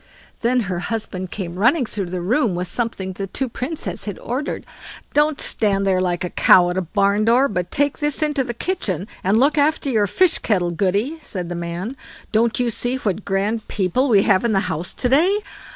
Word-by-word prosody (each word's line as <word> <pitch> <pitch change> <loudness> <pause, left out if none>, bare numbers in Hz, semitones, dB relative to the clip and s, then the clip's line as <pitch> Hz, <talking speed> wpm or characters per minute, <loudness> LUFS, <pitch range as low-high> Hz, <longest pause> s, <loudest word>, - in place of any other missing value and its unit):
Then 245 +2 +2
her 180 -4 -3
husband 185 -2 -4
came 180 -2 -5
running 250 +6 +3
through 200 -4 -4
the 180 0 -3
room 220 +1 +1
with 180 +1 -2
something 190 -2 -1
the 195 +1 -5
two 265 +7 -2
Princes 255 +6 -4
had 205 -3 -5
ordered. 260 +5 -4 0.5
"Don't 295 0 +2
stand 195 -3 0
there 190 -1 +2
staring 185 - +1
like 175 -1 -1
a 180 - -3
cow 175 -1 +5
at 180 - -3
a - - -1
barn 200 +3 +1
door, 245 +4 +4
but 180 -5 -3
take 285 0 0
this 295 0 0
into 295 -3 +1
the 240 -2 -5
kitchen, 210 - -2 0.2
and 200 +4 +3
look 290 +4 +3
after 290 -1 +1
your 210 -4 +2
fish 360 - +2
kettle, 180 -5 0
Goody", 200 - 0
said 180 - -5
the - - -3
man; 170 +8 -4 0.4
"don't 230 +2 +2
you 245 -1 +1
see 245 +3 -2
what 210 -5 -2
grand 205 +3 -1
people 220 +8 0
we 200 -4 +5
have 190 -2 +3
in 235 -2 +1
the 195 - +3
house 160 0 -4
to 250 - -2
day?" 330 +11 +4
215 Hz, 210 wpm, -21 LUFS, 185-255 Hz, 0.5 s, cow